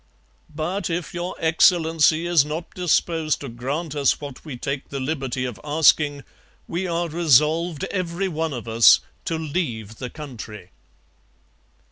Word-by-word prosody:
But 165 +7 -3
if 170 +1 -3
Your 175 +1 -4
Excellency 160 -1 +3
is 175 -4 +4
not 155 +3 -6
disposed 165 -3 +1
to 140 - -6
grant 140 +7 -4
us 145 -2 +2
what 140 -3 -9
we 145 -6 -7
take 140 +2 -4
the 140 - -4
liberty 130 -2 -2
of 125 -4 -6
asking, 150 -1 +3 0.4
we 185 +3 -2
are 170 0 -1
resolved, 160 0 +2
every 185 0 -2
one 160 -2 -2
of 120 -3 -6
us, 115 0 +6 0.2
to 165 - -1
leave 130 - -3
the 125 - -5
country.' 115 - -9
155 Hz, 140 wpm, -23 LUFS, 135-170 Hz, 0.4 s, us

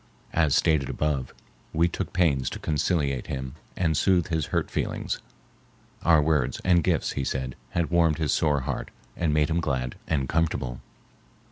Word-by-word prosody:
As 80 -4 +3
stated 75 -4 +2
above, 70 -4 -1 0.4
we 85 +2 +3
took 85 - -4
pains 75 -8 +2
to - - -6
conciliate 75 -3 0
him 65 -1 -4 0.2
and 80 -3 +1
soothe 90 +1 +2
his 80 -4 0
hurt - - -1
feelings. - - -2 0.8
Our 80 -3 +5
words 75 -5 +1
and 90 -2 +4
gifts, - - +1
he 70 - -2
said, 65 -1 -3
had 85 -1 -1
warmed 85 -3 +3
his 80 -4 +1
sore 75 -3 +2
heart 65 0 -3 0.3
and 85 -3 0
made 75 +1 +2
him 85 - +2
glad 65 -6 -2
and 70 -5 0
comfortable. 75 -6 -1
75 Hz, 160 wpm, -26 LUFS, 65-85 Hz, 0.8 s, Our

